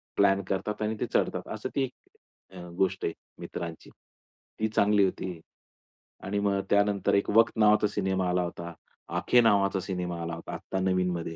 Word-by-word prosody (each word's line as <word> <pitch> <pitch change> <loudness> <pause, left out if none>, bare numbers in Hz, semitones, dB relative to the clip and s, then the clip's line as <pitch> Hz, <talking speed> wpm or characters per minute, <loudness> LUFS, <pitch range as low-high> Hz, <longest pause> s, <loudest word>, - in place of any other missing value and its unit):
Plan 100 -1 +4
करतात 105 +2 -2
आणि 110 +1 0
ते - - 0
चढतात. - - 0
असं - - -5
ती 135 - +2
एक 110 -6 -12
अ, 90 0 -8
गोष्ट 95 0 0
आहे 85 - -1 0.3
मित्रांची. 85 -2 -7 0.7
ती 110 - +1
चांगली 105 -1 +3
होती 90 -2 -4 0.8
आणि 100 +1 -1
मग 100 -1 +2
त्यानंतर 100 -1 +2
एक 100 - +1
वक्त 115 +1 +4
नावाचा 105 0 +5
सिनेमा 95 -2 -1
आला 90 0 +1
होता, 85 0 -6 0.4
आखे 125 - +4
नावाचा 100 -3 +3
सिनेमा 90 -2 -4
आला 85 0 -4
होता. 85 - -8
आत्ता 95 - -4
नवीनमध्ये 90 -3 0
95 Hz, 165 wpm, -28 LUFS, 90-105 Hz, 0.8 s, नावाचा